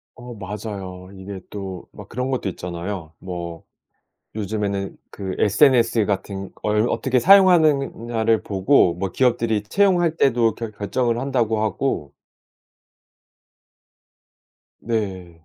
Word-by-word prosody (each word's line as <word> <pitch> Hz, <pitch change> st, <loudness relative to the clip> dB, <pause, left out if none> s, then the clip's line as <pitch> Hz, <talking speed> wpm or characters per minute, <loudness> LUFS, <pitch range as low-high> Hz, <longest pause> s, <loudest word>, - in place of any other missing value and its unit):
어 120 Hz, 0 st, -10 dB
맞아요. 100 Hz, -3 st, -7 dB
이게 95 Hz, 0 st, -8 dB
또 95 Hz, -3 st, -6 dB
막 -, -, -12 dB
그런 125 Hz, +2 st, -3 dB
것도 130 Hz, -6 st, -1 dB
있잖아요. 85 Hz, -1 st, -6 dB
뭐 85 Hz, -3 st, -7 dB, 0.7 s
요즘에는 100 Hz, -2 st, -3 dB
그 95 Hz, -2 st, -5 dB
SNS 115 Hz, -1 st, +4 dB
같은 95 Hz, -1 st, -3 dB
걸 105 Hz, +2 st, 0 dB
어떻게 130 Hz, -1 st, +1 dB
사용하느냐를 140 Hz, -, +4 dB
보고 95 Hz, -1 st, +3 dB
뭐 95 Hz, +2 st, -3 dB
기업들이 115 Hz, -4 st, +1 dB
채용할 175 Hz, -, +2 dB
때도 120 Hz, -7 st, +3 dB
결 115 Hz, -2 st, -6 dB
결정을 115 Hz, +3 st, -1 dB
한다고 120 Hz, -5 st, 0 dB
하고 105 Hz, -4 st, -2 dB, 2.7 s
네. 95 Hz, -7 st, -4 dB
105 Hz, 230 characters per minute, -22 LUFS, 95-120 Hz, 2.7 s, SNS